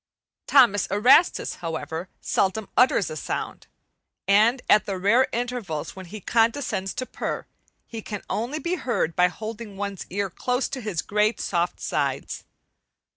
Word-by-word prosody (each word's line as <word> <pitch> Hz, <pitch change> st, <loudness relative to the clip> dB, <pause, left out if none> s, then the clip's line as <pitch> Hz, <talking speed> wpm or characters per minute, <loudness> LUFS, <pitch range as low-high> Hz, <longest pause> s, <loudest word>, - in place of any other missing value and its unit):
Thomas 240 Hz, -8 st, +5 dB
Erastus, 250 Hz, -, +4 dB
however, 165 Hz, +1 st, -5 dB
seldom 200 Hz, +2 st, 0 dB
utters 245 Hz, -7 st, +3 dB
a -, -, -5 dB
sound, 155 Hz, -, -5 dB, 0.6 s
and 220 Hz, +6 st, +4 dB
at 210 Hz, 0 st, +4 dB
the 195 Hz, -2 st, -2 dB
rare 215 Hz, +8 st, +3 dB
intervals 235 Hz, -10 st, -3 dB
when 190 Hz, -1 st, -9 dB
he 215 Hz, +5 st, -8 dB
condescends 225 Hz, -2 st, 0 dB
to 255 Hz, -, -3 dB
purr, -, -, -4 dB, 0.4 s
he 225 Hz, -2 st, -7 dB
can 210 Hz, -1 st, -6 dB
only 240 Hz, +8 st, -2 dB
be 345 Hz, +3 st, -2 dB
heard 200 Hz, -, -1 dB
by 180 Hz, -, +5 dB
holding 215 Hz, +2 st, -7 dB
one's 200 Hz, -2 st, -5 dB
ear 200 Hz, 0 st, -2 dB
close 250 Hz, +7 st, -1 dB
to 270 Hz, -2 st, -5 dB
his 200 Hz, -7 st, -3 dB
great, 210 Hz, +2 st, +1 dB
soft 175 Hz, -1 st, -1 dB
sides. -, -, -2 dB
210 Hz, 145 wpm, -25 LUFS, 190-240 Hz, 0.6 s, Thomas